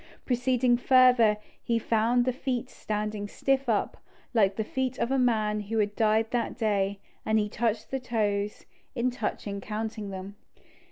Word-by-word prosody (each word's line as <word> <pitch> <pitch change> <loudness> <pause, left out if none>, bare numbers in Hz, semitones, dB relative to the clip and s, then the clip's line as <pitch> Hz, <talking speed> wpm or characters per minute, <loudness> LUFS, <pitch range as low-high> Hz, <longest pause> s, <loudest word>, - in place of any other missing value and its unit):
Proceeding 250 -1 +2
further, 250 -4 +5 0.2
he 235 - 0
found 230 +2 +2
the 255 - +1
feet 255 -1 -3
standing 210 -1 -3
stiff 270 +4 0
up, 215 -3 0 0.4
like 200 -4 +3
the 220 - -1
feet 260 +3 -2
of 235 - -1
a 270 - +2
man 215 -4 +2
who 210 +2 -3
had 205 -1 +1
died 220 0 +2
that 240 -1 -1
day, 200 -3 0 0.3
and 220 0 +2
he 210 -1 +1
touched 220 0 -2
the 265 - -1
toes, 210 -4 -1 0.3
and 235 -1 -1
in 255 - +2
touching 200 -4 -4
counted 215 0 -4
them. 195 +1 -7
225 Hz, 165 wpm, -28 LUFS, 210-245 Hz, 0.4 s, further